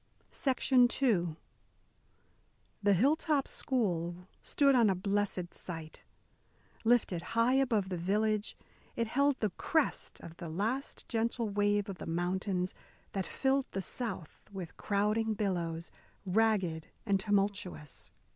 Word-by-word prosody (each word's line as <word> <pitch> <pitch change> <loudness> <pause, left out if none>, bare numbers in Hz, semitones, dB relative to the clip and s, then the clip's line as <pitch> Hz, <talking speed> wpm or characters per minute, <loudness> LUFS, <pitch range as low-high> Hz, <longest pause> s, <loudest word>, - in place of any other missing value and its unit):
II 245 - +3 1.5
The 205 -1 +4
Hilltop 285 - +2
School 180 -7 0
stood 280 -1 +3
on 235 -5 +5
a 190 - +2
blessed 195 -2 0
site. 165 -3 -6 0.8
Lifted 225 -7 +3 0.2
high 230 +2 +4
above 240 -8 +2
the 180 - -2
village, 210 +4 0 0.4
it 230 - 0
held 280 +4 +2
the 215 -3 +1
crest 315 - 0
of 165 - -10
the 170 - -6
last 220 - -2
gentle 230 -1 0
wave 205 0 +1
of 195 -3 -6
the - - -6
mountains 180 +2 -1 0.4
that 195 -2 -2
filled 270 0 +1
the 195 - -1
south 195 -10 -3
with 185 -4 -7
crowding 215 +2 +1
billows, 170 -5 -2 0.3
ragged 190 -5 +1 0.2
and 200 -3 +2
tumultuous. 195 -6 -1
205 Hz, 120 wpm, -32 LUFS, 180-230 Hz, 1.5 s, on